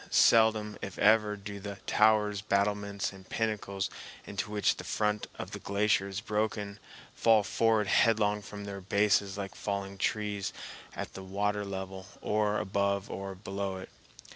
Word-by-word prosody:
Seldom, 110 -2 +4
if 95 - -6
ever, 105 0 +4
do 100 0 -7
the 100 0 -6
towers, 105 -2 +3
battlements, 100 -1 0
and 95 -1 -14
pinnacles 100 -3 -1 0.4
into - - -4
which 105 -1 +2
the - - -6
front 105 -1 0
of - - -6
the - - -5
glacier 100 -1 +1
is 100 +1 -4
broken 105 -1 -2 0.3
fall 110 -2 +4
forward 110 0 +2
headlong 105 0 +3
from 100 0 -8
their 100 -1 -6
bases 100 0 +2
like 100 -1 -4
falling 100 -1 -4
trees 105 -1 -1 0.4
at - - -5
the 95 - -7
water 105 +2 -1
level 95 -1 -6
or 105 0 +1
above 100 0 0
or 95 0 -5
below 95 0 -4
it. 95 - -9
100 Hz, 150 wpm, -30 LUFS, 100-105 Hz, 0.4 s, Seldom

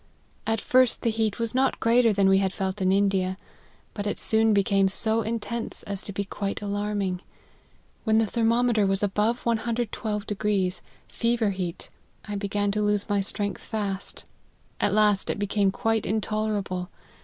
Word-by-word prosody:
At 225 0 +1
first 255 +2 +3
the 230 - +2
heat 220 -2 0
was 230 -2 -2
not 265 +1 +1
greater 230 0 +4
than 200 -1 +3
we 195 0 +5
had 190 -1 +1
felt 190 0 -3
in 185 0 +3
India, 190 -1 +1 0.6
but 205 -1 -4
it 205 - -2
soon 220 0 +3
became 200 -1 +3
so 220 +3 0
intense 230 +1 -4
as 200 -1 -4
to - - -6
be 200 +1 -3
quite 200 +1 -3
alarming. 205 -2 -2 0.8
When 220 -1 +3
the 225 - +4
thermometer 230 -1 +2
was 195 +1 0
above 210 +4 0
112, 225 -2 -1 0.8
fever 230 -3 0
heat, 180 -3 -5 0.4
I 205 - -4
be 200 0 -2
gan 205 0 0
to 210 +1 -1
lose 210 0 +1
my 205 -1 +2
strength 200 -1 -3
fast; 200 -3 -4 0.5
at 205 - +2
last, 210 -2 +3
it - - -1
became 205 0 +1
quite 225 +2 0
intolerable. 210 -4 -1
210 Hz, 160 wpm, -26 LUFS, 195-225 Hz, 0.8 s, we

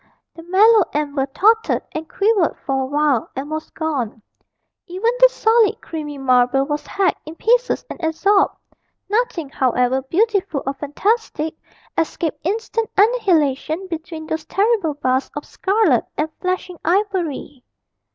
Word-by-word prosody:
The 330 - -11
mellow 410 +6 +5
amber 285 -2 -1
tottered 440 +10 +2
and 315 0 -6
quivered 400 -4 +1
for 270 -1 0
a - - -1
while 290 -4 +1
and 280 +3 -5
was 310 0 -4
gone; 255 -9 -3 0.6
even 385 +6 0
the - - +8
solid 450 -2 +2
creamy 300 -3 -6
marble 255 0 +3
was 295 +1 -4
hacked 390 -2 0
in 310 +2 -9
pieces 485 +6 +1
and 350 - -9
absorbed; 390 +5 +2 0.5
nothing, 415 - -1
however 255 -1 +1
beautiful 365 - 0
or 275 - -1
fantastic, 315 +2 -1 0.4
escaped 320 -1 -2
instant 445 +4 -2
annihilation 365 - +2
between 325 -1 -6
those 315 -1 -4
terrible 400 -7 +1
bars 260 -2 0
of 290 - -5
scarlet 385 - +1
and 310 +1 -1
flashing 365 -1 -3
ivory. 345 -8 -1
320 Hz, 130 wpm, -20 LUFS, 285-405 Hz, 0.6 s, the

